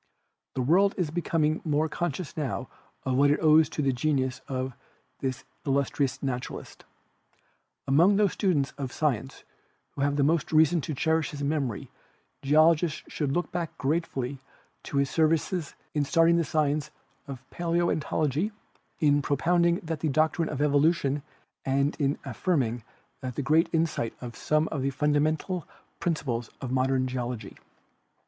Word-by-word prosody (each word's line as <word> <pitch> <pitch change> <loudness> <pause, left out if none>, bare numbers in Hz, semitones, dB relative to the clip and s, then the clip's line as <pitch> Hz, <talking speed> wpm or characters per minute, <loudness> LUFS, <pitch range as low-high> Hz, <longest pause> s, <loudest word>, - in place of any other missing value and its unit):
The 130 - 0
world 190 +9 +4
is 175 -6 -1
becom 165 -2 0
ing 155 +1 0
more 155 0 +1
conscious 170 0 -3
now 130 -5 -3 0.4
of 130 - -1
what 140 +2 +5
it 145 - +3
owes 155 -1 +5
to 150 - -2
the 135 -1 +2
genius 130 -1 0
of 130 -1 -3 0.5
this 130 0 -3 0.2
illustrious 140 0 0
naturalist. 125 -2 -5 1.0
Among 170 +9 +5
those 205 -2 +3
students 155 -9 +1
of 135 -2 -3
sci 150 0 +1
ence 135 +5 -12 0.5
who - - -6
have 145 +1 +1
most 155 0 +1
reason 160 +1 +4
to 150 - -4
cherish 160 +2 +1
his 145 -1 -6
memory 140 -7 -2 0.5
geolo 155 +4 +6
gists 155 -1 -3
should 145 -3 -2
look 175 +5 -1
back 170 -2 -4
gratefully 140 -3 -2 0.5
to 140 - -3
his 140 -1 +1
services 160 +1 +1 0.2
in 150 - +1
starting 165 +3 +4
the 170 - +2
science 150 -1 0 0.4
of 135 -1 -8
paleontology, 170 - 0 0.5
in 145 -2 +4
propounding 170 +4 +2
the 165 0 -2
doctrine 155 +3 +1
of 145 -1 -1
evolution 145 -1 +2 0.4
and 140 +2 +1
in 140 0 +1
affirming 125 -10 -1 0.4
with 130 +2 -4
great 160 +5 +3
insight 160 -8 0 0.2
some 155 +1 +1
of 145 - -3
the 135 - +1
fundamental 150 +5 0 0.3
principles 125 -9 -2
of 130 -2 -5
modern 130 0 +2
geology. 125 -2 -4
150 Hz, 145 wpm, -27 LUFS, 135-160 Hz, 1.0 s, geolo